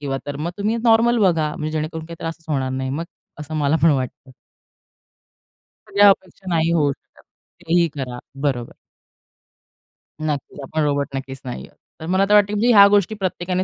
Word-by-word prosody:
किंवा 135 -2 -3
तर 145 -1 -4
मग 160 +4 -3
तुम्ही 210 +3 0
नॉर्मल 235 +1 +4
बघा. 160 -3 +1
म्हणजे 155 0 -3
जेणेकरून 155 +1 -3
काही 170 0 -9
त्रासच 165 0 -6
होणार 135 -3 -1
नाही, 130 0 -3
मग 155 +5 -3 0.4
असं 150 +1 -7
मला 150 0 +2
पण 165 - +6
वाटतं. 130 -1 -3 1.6
सगळ्या 205 0 +5
अपेक्षा 190 0 -1
नाही 165 -1 +1
होऊ 150 -4 +2
शकत - - -15 0.4
काहीही 170 +1 +3
करा. 125 -3 -5 0.2
बरोबर. 130 -5 -1 1.5
नक्कीच. 150 -3 -4
आपण 155 +4 -2
रोबोट 145 -1 0
नक्कीच 135 0 -6
नाही 120 - -6
आहोत. - - -26 0.2
तर 160 - -7
मला 185 +3 +2
तर - - +4
वाटतं, 205 0 +5
की 210 - -1
मी 245 - +4
ह्या 200 -1 +9
गोष्टी 205 +1 +2
प्रत्येकाने 185 -2 -2
160 Hz, 175 wpm, -21 LUFS, 140-190 Hz, 1.6 s, ह्या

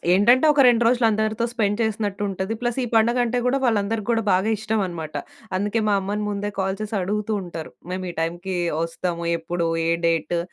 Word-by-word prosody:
ఏంటంటే 240 +9 +5
ఒక 290 - +3
2 240 -1 +4
రోజులు 240 0 +3
అందరితో 220 +2 0
స్పెండ్ 210 -3 0
చేసినట్టు 205 -2 -2
ఉంటది. 190 +3 -3
ప్లస్ 240 +1 -1
ఈ - - -3
పండగంటే 240 +2 +3
గూడా 265 +2 +2
వాళ్ళందరికీ 215 -2 0
గూడా 230 -1 +2
బాగా 190 +4 +2
ఇష్టమన్నమాట. 190 -8 -3 0.4
అందుకే 205 +4 0
మా 205 - +3
అమ్మని 205 +2 -2
ముందే 205 0 -3
కాల్ 190 +1 -1
చేసి 215 0 -3
అడుగుతూ 210 +3 -1
ఉంటారు. 165 -3 -7 0.2
"మేము 185 0 -3
ఈ - - -6
టైమ్‌కీ 175 +3 -2 0.3
ఒస్తాము, 170 0 -3
ఎప్పుడు, 170 +1 -2 0.2
ఏ - - +3 0.2
డేటు," 165 +1 0
205 Hz, 175 wpm, -23 LUFS, 185-225 Hz, 0.4 s, ఏంటంటే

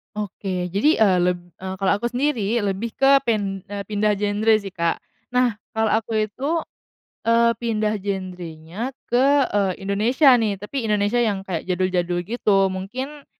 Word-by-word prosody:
Oke, 190 -3 -4
jadi 220 - +3
e 220 - +4
leb 175 0 0 0.2
e 190 - -9
kalau 190 0 +1
aku 240 - -1
sendiri 240 -4 0
lebih 205 +3 -3
ke 275 0 +5
pin 200 -4 0
e 200 0 -5
pindah 210 0 0
genre 210 +2 +2
sih 200 -2 -3
Kak. 170 -2 -1 0.3
Nah, 245 -4 +2 0.2
kalau 220 -1 +1
aku 220 +1 0
itu, 280 +10 -2 0.6
eee, 230 0 +3
pindah 215 -2 -1
genre-nya 185 +2 -5 0.2
ke, 270 +3 +3
eee, 195 -2 0
Indonesia 240 +8 +4
nih, 210 -4 -1
tapi 230 +4 -4
Indonesia 210 +1 +1
yang 215 -5 +1
kayak 185 -4 -4
jadul-jadul 180 -1 0
gitu. 195 -1 +1
Mungkin, 255 +10 -6
210 Hz, 150 wpm, -22 LUFS, 190-235 Hz, 0.6 s, ke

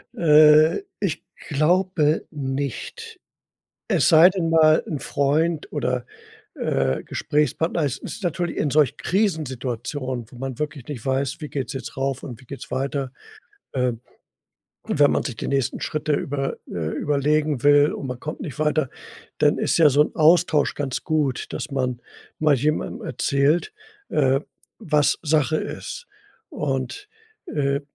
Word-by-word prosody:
Äh, 155 - +6 0.2
ich 180 -6 -2 0.2
glaube 160 +1 +2
nicht. 140 -2 -5 0.7
Es - - +3
sei 165 +2 +8
denn 180 -4 -1
mal 155 -1 +5
'n 150 -4 -4
Freund 150 +3 0
oder, 125 -4 -1 0.5
äh, 65 -1 0
Gesprächspartner. 155 +3 0
Es 135 -1 -2
ist 215 - -8
natürlich 175 0 -2
in 145 - 0
solchen 145 -3 +3
Krisensituationen, 130 - -2
wo 125 - -13
man 135 +1 -5
wirklich 145 -4 -4
nicht 135 -7 -7
weiß, 135 0 -1
wie 150 - -6
geht's 135 0 -4
jetzt 130 -1 -7
rauf 135 -1 -2
und 120 -4 -8
wie - - -17
geht's 140 - -9
weiter? 135 0 -2 0.6
Ähm, 125 -3 -1 0.8
und - - -3
wenn 145 - +7
man - - +1
sich 125 -5 -5
die - - -4
nächsten 135 -3 -1
Schritte 155 0 -2
über 135 -1 -2 0.2
äh, 80 -3 -3
überlegen 150 -1 +1
will 145 +1 +5
und 140 - -5
man 125 -1 -6
kommt 155 +2 -6
nicht 145 -2 -7
weiter, 155 -2 +1 0.5
dann - - +3
ist - - +1
ja 155 -3 +7
so 140 +2 +3
'n - - -5
Austausch 160 -1 +4
ganz 135 -3 -3
gut, 150 -5 -1
dass - - -5
man 130 -3 -2 0.4
mal 155 -2 +4
jemandem 150 +5 -1
erzählt, 150 - +1 0.3
äh, 135 -2 +2 0.4
was 150 -2 +2
Sache 155 -1 +2
ist. - - -6 0.4
Und, 150 - -3 0.4
äh, 140 -1 0
145 Hz, 145 wpm, -23 LUFS, 135-155 Hz, 0.8 s, sei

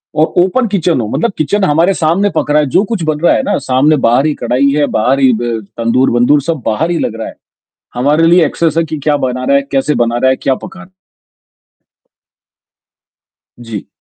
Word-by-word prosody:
औ 155 - +3 0.2
open 235 +6 0
kitchen 175 - 0
हो, 110 - -4
मतलब 235 - -1
किचन 175 +7 -1
हमारे 165 +3 +2
सामने 175 +5 0
पक - - -1
रहा 150 - +3
है, - - 0
जो 185 - +2
कुछ 205 -7 -2
बन 155 -1 -1
रहा 170 - +3
है - - +1
ना - - -1
सामने 135 +4 +3
बाहर 120 +5 +2
ही 155 - +1
कढ़ाई 125 +4 +1
है, 145 - +2
बाहर 125 +5 0
ही 130 -2 +4
ब 120 -2 -2 0.2
तंदूर-वंदूर 120 +4 +2
सब 160 0 -3
बाहर 150 +10 -1
ही 170 - -1
लग 115 - -3
रहा 110 - -4
है। - - -10 0.6
हमारे 145 +6 +2
लिए 170 0 +4
एक्सेस 160 +1 -1
है 165 - +3
कि 155 0 -5
क्या 150 -1 +1
बना 125 0 -4
रहा 140 - +2
है, - - +1
कैसे 140 +2 0
बना 120 0 0
रहा 130 +2 +2
है, - - +1
क्या 135 0 -1
पका 190 +7 -11
रहा 190 - -11
है? 185 - -34 2.7
जी। 115 -4 -8
145 Hz, 215 wpm, -13 LUFS, 125-165 Hz, 2.7 s, ही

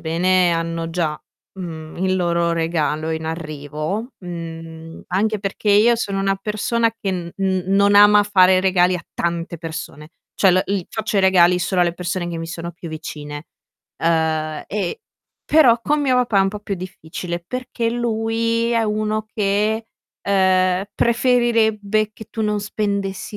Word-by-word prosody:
bene, 175 +2 +2
hanno 165 0 -2
già, 165 -3 -1 0.4
mhmm, 160 -4 -7
il 185 +1 +1
loro 170 -1 +1
regalo 160 -2 -1
in 160 0 -3
arrivo, 155 - -4
mhmm, 165 -2 -8
anche 210 +4 0
perché 200 +1 -2
io 215 +4 +5
sono 200 -4 -2
una 195 0 +1
persona 215 +3 0
che 225 -3 -4
n 175 -2 -4
n 190 -1 0
non 200 +1 +4
ama 205 0 +7
fare 185 -2 +5
regali 185 -1 +3
a 170 - -10
tante 170 0 -2
persone. 160 -2 -7 0.3
Cioè, 195 - +4
la 185 +1 +3
il 195 -3 -2
faccio 220 -1 -3
i - - +5
regali 180 -2 +5
solo 185 0 0
alle 170 -1 0
persone 175 0 -3
che 170 -1 -4
mi 165 - -5
sono 170 0 -6
più 175 0 -9
vicine. 150 -1 -7 0.6
Uhm, 160 -2 0
e 215 - -3 0.4
però 255 -7 +5
con 295 +5 +1
mio 265 -3 +2
papà 240 -5 +2
è - - +6
un 195 - +3
po' 210 +2 -5
più 205 -1 -3
difficile, 175 -1 -6
perché 250 -1 -3
lui 230 0 0
è 230 -1 +2
uno 215 0 -1
che, 210 +2 0 0.4
ehm, 185 -1 +2
preferirebbe 225 -3 +2
che 220 - -12
tu 225 - -5
non 210 -1 0
spendessi 200 -1 -3
190 Hz, 160 wpm, -20 LUFS, 170-215 Hz, 0.6 s, ama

